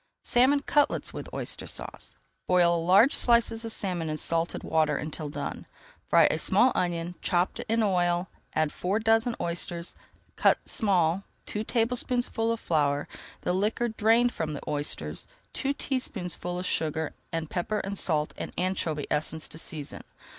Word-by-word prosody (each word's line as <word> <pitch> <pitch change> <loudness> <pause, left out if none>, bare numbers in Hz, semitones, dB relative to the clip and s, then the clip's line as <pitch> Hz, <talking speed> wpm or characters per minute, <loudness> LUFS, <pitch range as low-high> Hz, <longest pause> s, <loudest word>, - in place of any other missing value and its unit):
SALMON 265 +4 +4
CUTLETS 290 0 +1
WITH - - -7
OYSTER - - -5
SAUCE - - -4 0.3
Boil 170 -2 +4
large 195 - +6
slices 235 -1 +4
of 225 - -4
salmon 180 -7 -1
in 155 - -2
salted 165 +2 0
water 155 -2 +2
[Page 155 - -4
269] 150 0 -4
until - - -6 0.3
done. - - -15 0.4
Fry - - +6
a - - -1
small 260 - +4
onion, 175 -1 -1
chopped, 180 0 +1
in 225 0 +2
oil, 175 -2 +1 0.3
add 155 -1 +2
four 190 +4 -1
dozen 225 +2 +2
oysters, 170 0 -2 0.4
cut - - +4
small, 185 -4 +2 0.2
two 210 - -2
tablespoonfuls 235 0 +1
of 230 - -5
flour, 145 -5 +1 0.3
the - - 0
liquor 215 +5 0
drained 230 +3 +3
from 155 -2 -3
the 145 - -5
oysters, 145 0 -3 0.3
two 275 - 0
teaspoonfuls 180 -11 -3
of - - -6
sugar, 160 -2 -1 0.2
and 165 -1 -3
pepper, 210 +4 -1
salt, 155 -6 +1
and - - -4
anchovy 175 -5 -1
essence 155 +1 -1
to 160 - -10
season. 150 -3 -5
180 Hz, 155 wpm, -28 LUFS, 160-225 Hz, 0.4 s, large